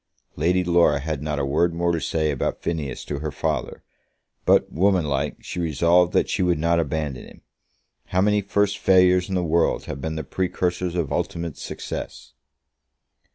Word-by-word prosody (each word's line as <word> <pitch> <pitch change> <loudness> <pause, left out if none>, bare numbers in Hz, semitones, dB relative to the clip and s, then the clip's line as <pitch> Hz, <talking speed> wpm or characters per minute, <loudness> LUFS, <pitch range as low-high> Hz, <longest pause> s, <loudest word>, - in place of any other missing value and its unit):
Lady 90 +5 +1
Laura 85 -4 +3
had 75 -1 -4
not 75 -1 -2
a 70 - 0
word 85 +5 +1
more 85 0 +1
to 85 -2 -1
say 80 -2 0
about 70 - -3
Phineas 80 -6 -3
to 70 - -4
her 75 0 -4
father; - - -3 0.6
but, - - +3
womanlike, 85 -6 +1
she - - -5
resolved 85 +2 +3
that - - +2
she - - -1
would 90 -2 +2
not 85 +2 +2
abandon 75 -4 -3
him. - - -16 0.6
How 90 - 0
many 105 +1 +3
first 100 +1 0
failures 90 0 +4
in 95 - -1
the 90 - +1
world 85 0 +1
had 70 - -6
been 80 +2 -3
the 80 - -3
precursors 90 +2 -2
of 80 -5 -1
ultimate 85 -3 -3
success! - - -7
85 Hz, 170 wpm, -23 LUFS, 75-90 Hz, 0.6 s, failures